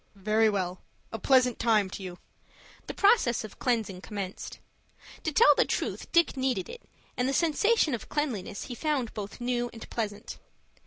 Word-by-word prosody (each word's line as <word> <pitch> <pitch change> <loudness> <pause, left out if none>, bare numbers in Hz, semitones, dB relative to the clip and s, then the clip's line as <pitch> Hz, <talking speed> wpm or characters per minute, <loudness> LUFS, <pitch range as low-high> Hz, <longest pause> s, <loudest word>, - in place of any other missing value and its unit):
"Very 215 +3 +2
well. 185 -3 -2 0.3
A 225 - -5
pleasant 250 +1 +3
time 220 -4 +3
to - - -7
you." 180 -2 -7 0.7
The - - -4
process 400 - +3
of 215 - -10
cleansing 220 -7 -1
commenced. 200 -2 -6 0.6
To 315 - -2
tell 295 0 +7
the - - +3
truth - - -3
Dick 340 -4 +3
needed 265 +5 -1
it, 480 0 -9 0.3
and 250 +1 0
the - - -1
sensation 335 - +2
of 230 - -5
cleanliness 235 -8 -2
he 250 - -7
found 270 -3 -1
both 205 +1 -7
new 240 0 -1
and 225 - -10
pleasant. 210 -2 -4
235 Hz, 165 wpm, -28 LUFS, 205-275 Hz, 0.7 s, tell